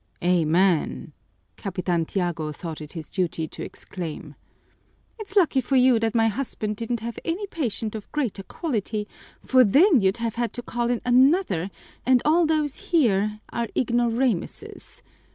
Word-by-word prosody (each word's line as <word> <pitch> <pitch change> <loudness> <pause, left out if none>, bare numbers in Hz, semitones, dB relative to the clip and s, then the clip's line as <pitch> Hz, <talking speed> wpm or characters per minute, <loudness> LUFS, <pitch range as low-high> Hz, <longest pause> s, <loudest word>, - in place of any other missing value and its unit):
"Amen!" 175 -2 +2 0.4
Capitan 180 -3 -1
Tiago 170 -4 -2
thought 160 +1 -7
it 150 - -9
his 160 -3 -7
duty 170 -4 -2
to - - -8
exclaim. 170 -4 -7 0.9
"It's 405 -2 -8
lucky 325 -9 +4
for 265 +2 -1
you 255 -2 +5
that 225 0 -1
my 225 -1 +4
husband 215 -3 -3
didn't 230 0 -3
have 235 +1 -5
any 350 +5 -2
patient 235 - -3
of 215 -2 -8
greater 260 -10 -2
quality, 215 - -3 0.4
for 255 -1 +6
then 285 - +5
you'd 190 +3 +2
have 230 -1 -3
had 235 - -1
to 245 - -5
call 240 0 -2
in 245 -1 0
another, 250 - +3 0.3
and 255 -1 +4
all 325 +2 +4
those 305 -3 0
here 215 - +2
are 235 0 -2
ignoramuses. 240 -3 -1
230 Hz, 150 wpm, -24 LUFS, 190-260 Hz, 0.9 s, for